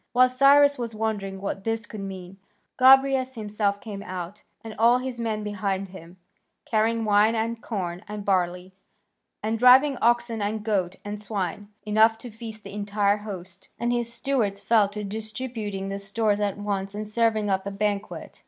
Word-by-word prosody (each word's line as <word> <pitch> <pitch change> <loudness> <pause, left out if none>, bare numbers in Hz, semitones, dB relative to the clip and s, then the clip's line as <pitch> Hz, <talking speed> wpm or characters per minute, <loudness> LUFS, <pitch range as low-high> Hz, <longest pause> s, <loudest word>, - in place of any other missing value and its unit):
While 255 +1 +5
Cyrus 280 +2 +5
was 230 -2 -4
wondering 205 -3 -3
what 195 0 -4
this 225 +1 -2
could 215 - -9
mean, 190 -1 -8 0.4
Gobryas 265 0 +5
himself 210 -2 -1
came 205 -3 -7
out, 185 0 -7 0.2
and 225 -1 -7
all 235 +2 +5
his 255 -1 -5
men 220 -2 -2
behind 195 -2 -2
him, 180 -1 -12 0.5
carrying 225 +1 +1
wine 210 +2 +4
and 225 +1 -2
corn 180 -7 -4
and 210 -1 -6
barley, 180 -1 0 0.7
and 220 +1 -1
driving 260 +3 +6
oxen 240 -1 +2
and 210 +1 -2
goats 190 -4 -1
and 205 0 -5
swine, 205 -1 -4 0.2
enough 220 +1 +4
to 240 +1 -9
feast 220 -1 -9
the 200 - -9
entire 205 0 +1
host. 190 -3 -9
And 240 0 0
his 240 -1 0
stewards 235 -5 -1
fell 205 0 +3
to 210 +1 -6
distributing 215 -1 -5
the 195 0 -4
stores 205 +1 0
at 205 -2 -1
once, 200 -1 -3
and 210 0 -4
serving 215 -1 +1
up 190 +1 -1
a - - -3
banquet. 205 0 -3
210 Hz, 170 wpm, -25 LUFS, 200-230 Hz, 0.7 s, driving